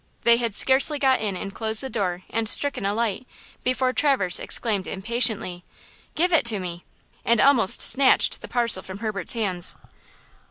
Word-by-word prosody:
They 235 0 +4
had 235 -4 -4
scarcely 275 +3 +3
got 265 -3 0
in 200 -4 -4
and 195 +2 -8
closed 220 0 -1
the - - -5
door 185 -7 -5
and 225 -1 -2
stricken 280 -8 0
a 200 - -2
light 230 +1 -4 0.4
before 255 0 -1
Traverse 255 - +2
exclaimed 205 -5 -2
impatiently: 215 -3 -2 0.5
"Give 355 +3 0
it 270 -8 +3
me!" 180 -4 -7 0.4
and 235 -1 0
almost 245 -7 +4
snatched 270 -1 +3
the - - -10
parcel 235 -6 +3
from 190 0 -11
Herbert's 205 -4 -3
hands. 190 -7 -1
225 Hz, 160 wpm, -22 LUFS, 195-255 Hz, 0.5 s, They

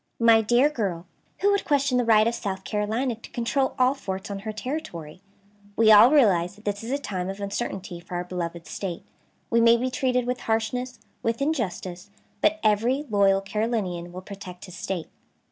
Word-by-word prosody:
"My 230 -1 +6
dear 240 +5 +4
girl, 195 - -3 0.4
who 405 - +4
would 400 -1 +1
question 280 -3 +2
the - - +2
right 220 -2 +5
of 230 - +1
South 190 -4 -4
Carolina 220 +5 -1
to 225 - -12
control 265 +3 -1
all 255 +1 +4
forts 195 -7 -6
on 200 - -4
her 215 +2 -5
territory? 210 - -6 0.5
We 220 -1 +5
all 215 +3 +9
realize 200 - +3
that 210 - -19
this 205 +1 -2
is 230 - -6
a 275 - 0
time 190 -9 -4
of 195 +1 -6
uncertainty 200 -3 -4
for 175 +1 -8
our 175 - -1
beloved 175 -1 -5
State; 180 -4 -5 0.5
we 230 0 +4
may 230 0 +6
be 255 +2 -2
treated 250 -1 0
with 250 0 -2
harshness, 235 +3 -2 0.2
with 230 0 -1
injustice, 195 - -3 0.3
but 320 +1 +3
every 230 +7 +2
loyal 195 -1 +4
Carolinian 195 -4 -2
will 180 +1 -7
protect 185 -2 -9
his 180 -2 -11
State." 185 -4 -4
215 Hz, 185 wpm, -25 LUFS, 190-250 Hz, 0.5 s, all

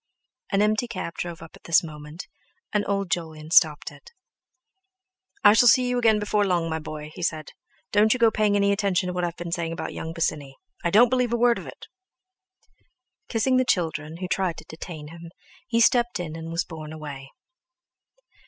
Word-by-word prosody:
An 200 0 +3
empty 215 +3 +1
cab 185 -7 -5
drove 170 -1 -6
up 165 - -13
at - - -20
this 170 0 +4
moment, 150 +1 -9 0.5
and 210 -1 +2
old 200 -3 -1
Jolyon 160 -3 -4
stopped 155 -5 +4
it. 145 -1 -16 1.3
"I 205 - +8
shall 245 +2 +5
see 255 +1 +5
you 245 0 0
again 225 -3 +4
before 210 0 +1
long, 175 -4 +1
my 160 - -2
boy!" 155 -1 -8
he - - -9
said. 155 -3 -2 0.4
"Don't 210 +2 +4
you 255 - +3
go 230 -2 +4
paying 210 -1 +1
any 200 0 +3
attention 200 -2 +1
to 180 - -3
what 180 0 -2
I've 170 -1 -2
been 175 -1 -6
saying 165 -1 -2
about - - -5
young 160 - -5
Bosinney—I 165 - -4
don't 230 +4 +6
believe 250 -2 +1
a - - +2
word 235 0 +3
of - - -10
it!" - - -11 1.4
Kissing 255 +3 +2
the 255 - +4
children, 160 - -1
who 185 +1 -4
tried 185 -2 -1
to 160 - -11
detain 160 -2 -9
him, 170 +1 -11 0.4
he 230 -2 +1
stepped 240 -1 +3
in 160 -3 -5
and 165 0 -7
was 165 +1 -1
borne 155 -2 -9
away. 145 -4 -8
175 Hz, 190 wpm, -25 LUFS, 160-215 Hz, 1.4 s, I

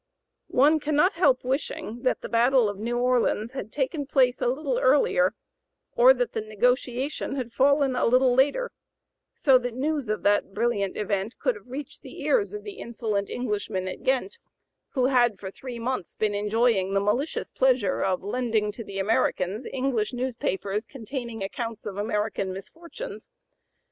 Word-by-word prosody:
One 295 +5 +4
cannot 305 +6 +2
help 285 -7 +3
wishing 255 -3 -3
that 255 - 0
the - - -5
battle 240 +1 +4
of 205 -1 -4
New 235 +3 -2
Orleans 245 -2 +1
had 240 -5 -6
taken 285 +1 -2
place 255 -3 +2
a - - +2
little 265 0 0
earlier, 290 - +3 0.6
or - - +8
that - - -1
the - - -1
negotiation 250 +6 -1
had 245 -4 -4
fallen 275 -1 +3
a - - +2
little 255 +1 +4
later, 285 - +2 0.6
so 270 -6 +5
that 245 -1 -4
news 285 -2 -1
of 215 - -2
that 205 -1 +2
brilliant 210 -4 0
event 205 +1 -2
could 255 -3 +1
have 210 0 -14
reached 280 +3 -7
the - - -10
ears 445 -5 +2
of 420 0 -7
the 405 -2 -8
insolent 220 -4 -3
Englishmen 205 -6 -2
at 185 - -6
Ghent, 270 - 0 0.5
who 255 -3 +2
had 240 -6 +3
for 190 -1 -6
three 250 +3 -8
months 235 -5 -3
been 215 -1 0
enjoying 205 -2 +1
the - - +4
malicious 220 +10 -1
pleasure 250 -7 +2
of 185 -1 0
lending 220 -1 0
to 230 +3 -8
the 195 -2 -8
Americans 195 +1 0
English 255 -4 -1
newspapers 220 -5 -2
containing 235 -3 -6
accounts 225 +3 -5
of 200 -2 -5
American 210 -2 -1
misfortunes. 330 - -9
245 Hz, 165 wpm, -26 LUFS, 210-270 Hz, 0.6 s, or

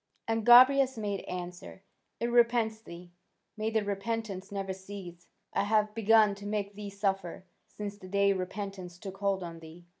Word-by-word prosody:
'" - - -43
And 225 0 0
Gobryas 260 +1 +7
made 205 -2 -2
answer: 180 +1 -7 0.4
"It 235 0 -1
repents 235 -2 +3
thee: 175 -3 -11 0.4
may 215 0 -2
that 220 -2 0
repentance 200 -1 -3
never 195 -1 -3
cease! 190 -2 -10 0.3
I 200 - +1
have 215 0 +2
begun 220 -1 +4
to 205 - -6
make 205 -1 -2
thee 205 0 -7
suffer, 195 -2 -2 0.2
since 205 -1 -7
the 185 - -11
day 200 +1 +3
repentance 185 -1 -5
took 195 0 -8
hold 195 -2 0
on 165 -1 -7
thee." 165 +2 -13
200 Hz, 170 wpm, -30 LUFS, 190-220 Hz, 0.4 s, Gobryas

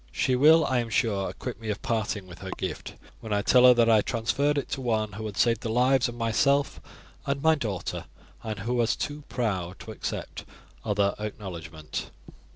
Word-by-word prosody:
She 130 - +1
will, 155 +4 +6
I 130 -1 +1
am 120 -1 -3
sure, 105 -4 0
acquit 125 -2 -7
me 110 - -5
of 105 -1 -2
parting 110 -4 -1
with 90 -2 -12
her 95 - -7
gift 90 -5 -5 0.2
when 110 - -8
I 100 0 +1
tell 125 +2 +6
her 125 - +8
that 120 -1 +4
I 110 -2 +5
transferred 130 +8 0
it 140 - -1
to 135 - -3
one 110 -4 0
who 110 +2 -5
had 100 - -8
saved 115 -1 +2
the 115 - -3
lives 125 +2 +3
of 120 - -8
myself 135 +5 +1 0.5
and 140 0 0
my 160 +3 +4
daughter, 110 - -3 0.4
and 110 -3 -5
who 115 +5 -2
was 120 -2 +2
too 145 +1 -4
proud 95 -7 -2
to - - -8
accept - - -5 0.4
other 100 -2 +1
acknowledgment." 85 -7 -6
115 Hz, 195 wpm, -27 LUFS, 100-125 Hz, 0.5 s, her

